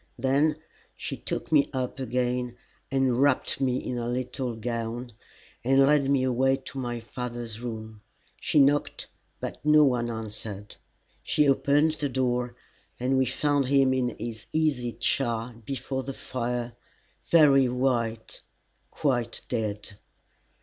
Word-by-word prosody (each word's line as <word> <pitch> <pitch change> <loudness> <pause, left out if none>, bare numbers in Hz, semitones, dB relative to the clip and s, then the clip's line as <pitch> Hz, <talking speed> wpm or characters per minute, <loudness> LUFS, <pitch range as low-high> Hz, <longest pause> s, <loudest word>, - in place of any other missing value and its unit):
Then 140 +5 +2 0.4
she - - -5
took - - -5
me 145 -3 +4
up 130 0 -3
again 125 -1 -1 0.3
and 135 -2 +2
wrapped 140 -1 +2
me 130 -2 +2
in 125 -1 -3
a 120 - -3
little 125 0 -2
gown, 115 +1 -3 0.5
and 135 +2 +5
led 140 -1 +3
me 140 -2 +3
away 130 +1 +3
to 135 0 -8
my 120 -2 -3
father's 120 -1 -6
room. 110 -3 -6 0.4
She - - 0
knocked, 145 +1 +3 0.3
but - - -6
no 150 0 +6
one 125 -4 +2
answered. 105 -2 -6 0.4
She 150 -1 +2
opened 145 +3 +3
the 150 -2 -2
door, 125 -2 0 0.4
and 130 +2 +1
we 130 -1 +3
found 140 +1 +1
him 135 -1 +4
in 130 -2 +1
his 110 -1 -6
easy 140 -7 0
chair 120 0 -1
before 130 +1 -3
the 135 +1 -5
fire, 120 -1 -3 0.6
very 140 -5 +6
white, 120 -3 -1 0.5
quite 120 -5 -1
dead. 105 -3 -3
125 Hz, 135 wpm, -27 LUFS, 120-135 Hz, 0.6 s, no